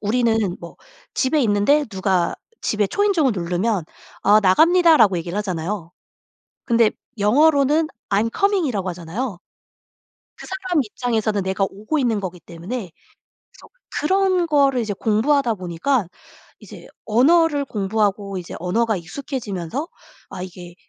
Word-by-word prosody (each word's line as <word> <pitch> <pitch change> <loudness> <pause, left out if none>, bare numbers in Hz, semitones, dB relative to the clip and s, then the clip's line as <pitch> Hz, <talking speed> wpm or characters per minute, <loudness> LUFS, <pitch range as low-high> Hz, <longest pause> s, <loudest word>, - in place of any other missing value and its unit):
우리는 220 -3 +1
뭐 170 - -10 0.4
집에 285 +3 +1
있는데 225 +7 +3
누가 190 -3 0 0.3
집에 210 -1 +1
초인종을 350 - +2
누르면 180 +1 -1 0.4
"아 210 +1 +5
나갑니다."라고 310 - +5
얘기를 170 +3 -5
하잖아요. 185 -2 -3 0.7
근데 230 -2 +3 0.3
영어로는 290 +7 +3 0.2
"I'm 210 +3 +1
coming."이라고 320 - +1
하잖아요. 180 +5 -5 1.0
그 - - -11
사람 375 -4 -1
입장에서는 220 -3 -1
내가 190 +1 0
오고 215 +10 -3
있는 235 -5 +1
거기 185 -2 -6
때문에. 175 +5 -7 0.6
그래서 - - -18 0.3
그런 370 +2 +2
거를 280 -5 +3
이제 220 -3 -2
공부하다 230 +5 +1
보니까 185 +6 -1 0.5
이제 - - -12 0.2
언어를 290 +6 +3
공부하고 200 -3 -1
이제 175 - -8
언어가 220 +5 0
익숙해지면서 205 - -5 0.4
아 180 - -7
이게 180 -1 -10
215 Hz, 325 characters per minute, -21 LUFS, 190-280 Hz, 1.0 s, 아